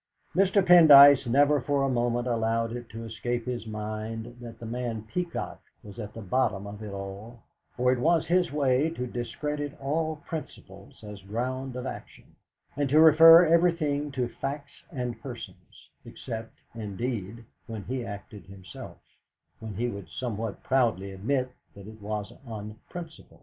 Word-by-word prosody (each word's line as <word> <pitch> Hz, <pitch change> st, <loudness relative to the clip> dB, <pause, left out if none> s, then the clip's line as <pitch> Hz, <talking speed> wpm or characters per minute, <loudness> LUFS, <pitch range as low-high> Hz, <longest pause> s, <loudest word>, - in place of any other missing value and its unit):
Mr. 195 Hz, 0 st, +3 dB
Pendyce 145 Hz, -6 st, +9 dB
never 145 Hz, +3 st, +4 dB
for 140 Hz, +1 st, 0 dB
a -, -, +2 dB
moment 120 Hz, -1 st, 0 dB
allowed 115 Hz, -1 st, 0 dB
it 120 Hz, -1 st, -8 dB
to 115 Hz, +1 st, -8 dB
escape 115 Hz, +1 st, -3 dB
his 120 Hz, -3 st, -4 dB
mind 110 Hz, +2 st, -5 dB
that 115 Hz, -1 st, -9 dB
the 115 Hz, -, -8 dB
man 115 Hz, -1 st, -4 dB
Peacock 170 Hz, +9 st, -4 dB, 0.2 s
was 105 Hz, +2 st, -11 dB
at 105 Hz, -2 st, -6 dB
the 115 Hz, -, -7 dB
bottom 100 Hz, -1 st, 0 dB
of 100 Hz, +1 st, -9 dB
it 105 Hz, -2 st, -7 dB
all; 100 Hz, +4 st, -8 dB, 0.3 s
for 125 Hz, 0 st, +3 dB
it 130 Hz, -, 0 dB
was 165 Hz, +5 st, +2 dB
his 175 Hz, +2 st, +2 dB
way 140 Hz, 0 st, +2 dB
to 125 Hz, -6 st, -4 dB
discredit 145 Hz, +4 st, -4 dB
all 155 Hz, +3 st, -1 dB
principles 100 Hz, -, -9 dB
as 105 Hz, -2 st, -9 dB
ground 125 Hz, +6 st, -4 dB
of 125 Hz, 0 st, -5 dB
action, -, -, -8 dB, 0.5 s
and 145 Hz, -1 st, -1 dB
to 150 Hz, +3 st, +5 dB
refer 165 Hz, +2 st, +9 dB
everything 160 Hz, -4 st, +2 dB
to 130 Hz, -3 st, -1 dB
facts 140 Hz, +4 st, -6 dB
and 125 Hz, -5 st, -4 dB
persons; -, -, -10 dB
except, 115 Hz, -2 st, -8 dB, 0.2 s
indeed, 115 Hz, 0 st, -5 dB, 0.2 s
when 110 Hz, -3 st, -6 dB
he 130 Hz, +2 st, -4 dB
acted 100 Hz, -2 st, -9 dB
himself, 95 Hz, -2 st, -11 dB, 0.6 s
when 110 Hz, -3 st, -7 dB
he 120 Hz, +5 st, -1 dB
would 100 Hz, -8 st, -7 dB
somewhat 110 Hz, +1 st, -5 dB
proudly 115 Hz, -7 st, +1 dB
admit 125 Hz, +7 st, -1 dB, 0.2 s
that 100 Hz, -1 st, -11 dB
it 110 Hz, 0 st, -12 dB
was 105 Hz, -1 st, -4 dB
on 105 Hz, -1 st, -7 dB
principle. 170 Hz, -2 st, -10 dB
120 Hz, 155 wpm, -27 LUFS, 110-140 Hz, 0.6 s, Pendyce